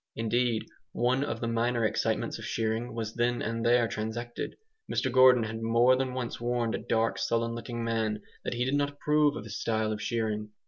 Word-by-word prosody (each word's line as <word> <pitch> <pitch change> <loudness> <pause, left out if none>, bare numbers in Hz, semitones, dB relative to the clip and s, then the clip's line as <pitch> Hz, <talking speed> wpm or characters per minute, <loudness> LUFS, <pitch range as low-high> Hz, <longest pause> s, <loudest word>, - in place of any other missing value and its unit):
Indeed, 115 0 0 0.3
one 125 +3 +1
of 145 - -3
the 115 - -1
minor 115 0 +1
excitements 110 - -1
of - - -7
shearing 115 +1 -2
was 110 -1 -3
then 120 0 0
and 115 +1 -2
there 120 0 +4
transacted. 110 +2 -4 0.4
Mr 130 - 0
Gordon 130 -1 +7
had 110 +1 -4
more 115 +3 +4
than 130 -1 -2
once 125 -2 -4
warned 120 -1 0
a - - -1
dark 115 0 0
sullen 115 0 0
looking 120 0 -5
man 110 -2 -1 0.2
that - - -3
he 120 +1 0
did 130 - -1
not 145 0 +2
approve 150 +1 +2
of - - -5
his 105 -1 -6
style 110 -1 0
of 105 0 -3
shearing. 110 -2 -2
115 Hz, 195 wpm, -29 LUFS, 110-125 Hz, 0.4 s, Gordon